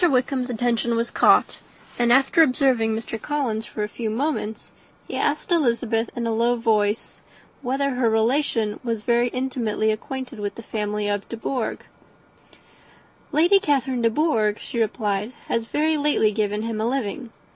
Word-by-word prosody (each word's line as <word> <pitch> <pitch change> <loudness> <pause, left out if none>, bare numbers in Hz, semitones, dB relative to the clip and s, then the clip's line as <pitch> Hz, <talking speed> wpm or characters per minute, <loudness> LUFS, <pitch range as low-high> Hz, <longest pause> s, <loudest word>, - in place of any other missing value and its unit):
Wickham's 255 -1 0
attention 235 0 0
was 230 +1 -1
caught; - - +4 0.4
and 240 -1 +3
after 270 +6 +5
observing 255 -6 +3
Mr. 225 -1 -5
Collins 245 -7 -2
for 210 - -4
a - - -1
few 220 +1 -4
moments, 225 -2 -3 0.4
he - - -5
asked 300 +4 -1
Elizabeth 235 -7 +1
in 235 - -2
a 230 - 0
low 235 +2 +2
voice 220 -2 0 0.4
whether 275 +2 0
her 250 -2 +1
relations 225 -1 +1
were 230 -2 0
very 235 +2 +1
intimately 240 -4 -1
acquainted 255 +2 -5
with 205 -1 -3
the 230 - -9
family 210 -1 -2
of 205 -1 -2
De 230 - -5
Bourgh. 245 +1 -3 1.5
"Lady 340 +6 +5
Catherine 265 -6 0
de 230 - +4
Bourgh," 225 -6 +1
she 235 - -5
replied, 210 0 -1
"has 230 -1 -1
very 310 +5 +1
lately 290 -7 +2
given 210 0 -1
him 225 -1 -3
a 220 - 0
living. 245 -1 -3
235 Hz, 155 wpm, -23 LUFS, 220-265 Hz, 1.5 s, after